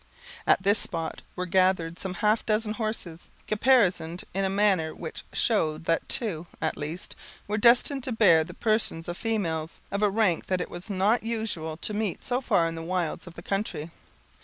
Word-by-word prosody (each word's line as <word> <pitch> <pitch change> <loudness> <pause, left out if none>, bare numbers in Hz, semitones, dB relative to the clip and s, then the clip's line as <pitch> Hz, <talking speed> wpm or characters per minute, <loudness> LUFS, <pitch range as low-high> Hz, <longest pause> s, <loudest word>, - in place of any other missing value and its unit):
At - - +4
this 205 +1 +4
spot 165 -1 -2
were 180 - -2
gathered 180 -2 +2
some 190 -1 -4
half 215 +2 +3
dozen 215 0 0
horses, 215 -7 -5 0.2
caparisoned 205 -7 +2
in 195 - 0
a 190 - +1
manner 195 -5 +2
which 160 - -6
showed 160 -8 +1
that 165 0 0
two, 175 - 0
at - - -1
least, 155 +5 -6 0.3
were 210 +1 -1
destined 245 +4 +5
to 260 - -2
bear 185 -8 +5
the 175 +2 -10
persons 215 -7 0
of 175 - -3
females, 170 -8 -2
of 200 - -1
a 210 - +4
rank 200 -5 +1
that 185 -1 0
it 180 - -4
was 175 +4 -7
not 200 +4 +2
usual 215 -9 -3
to 210 - -2
meet 210 -3 -2
so 250 +1 0
far 200 -9 +2
in 165 - -2
the 165 - -6
wilds 175 0 -2
of 170 - -11
the 170 - -10
country. 195 -6 -3
190 Hz, 185 wpm, -27 LUFS, 165-215 Hz, 0.3 s, destined